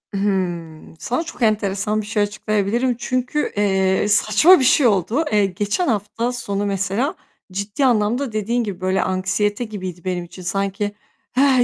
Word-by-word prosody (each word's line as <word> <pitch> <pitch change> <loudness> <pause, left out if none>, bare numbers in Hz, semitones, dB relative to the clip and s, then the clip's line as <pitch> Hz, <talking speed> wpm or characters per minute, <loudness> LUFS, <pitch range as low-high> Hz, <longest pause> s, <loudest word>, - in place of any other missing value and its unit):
Hıı. 175 -5 -2
Sana 250 +8 -1
çok 325 -6 -10
enteresan 210 -1 +1
bir 205 - -9
şey 210 -1 0
açıklayabilirim. 215 +4 0
Çünkü, 255 +4 -1
eee, 190 -1 +2
saçma 215 - +5
bir - - +1
şey 260 +1 +5
oldu. 215 - +1
Eee, 205 -1 +4
geçen 205 - -1
hafta 225 +1 -1
sonu, 205 -5 -3
mesela, 200 +7 -1 0.4
ciddi 200 +8 -1
anlamda, 235 +2 +1
dediğin 230 +3 -1
gibi, 195 -4 -6
böyle, 185 +1 +1
anksiyete 205 +4 0
gibiydi 185 -5 -7
benim 180 -1 -2
için. 185 +2 -12
Sanki, 195 +3 -2 0.5
eh, 265 -2 +5
205 Hz, 150 wpm, -21 LUFS, 195-240 Hz, 0.5 s, saçma